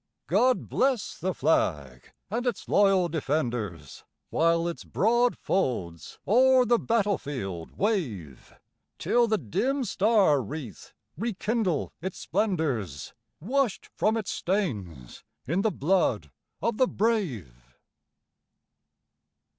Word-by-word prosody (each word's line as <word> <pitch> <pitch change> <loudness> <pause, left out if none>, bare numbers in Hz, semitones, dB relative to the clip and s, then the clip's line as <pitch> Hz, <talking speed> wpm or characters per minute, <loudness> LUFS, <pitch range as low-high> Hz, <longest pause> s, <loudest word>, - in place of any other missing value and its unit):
God 255 0 +2
bless 260 -5 0
the 185 +3 -1
Flag 75 - -1 0.2
and 240 +3 -1
its 240 - -2
loyal 195 -3 +4
defenders, 125 - -3 0.3
While 165 +1 +2
its 170 - -5
broad 240 +4 +2
folds 95 - -2
o'er 255 +4 +5
the 240 0 +3
battle 210 -4 +1
field 95 - -6
wave, 120 - -2 0.5
Till 240 -1 +2
the 215 -1 +2
dim 255 - -1
star 200 - +3
wreath 120 - -8 0.2
rekindle 215 - -1
its 185 +1 -5
splendors, 155 - -2 0.3
Washed 245 - -1
from 220 +2 +1
its 215 -3 -3
stains 105 - -3 0.2
in 170 +9 0
the 220 - +2
blood 140 - 0 0.3
of 230 -2 0
the 255 - +4
brave! 110 - -2
180 Hz, 105 wpm, -27 LUFS, -, 0.5 s, o'er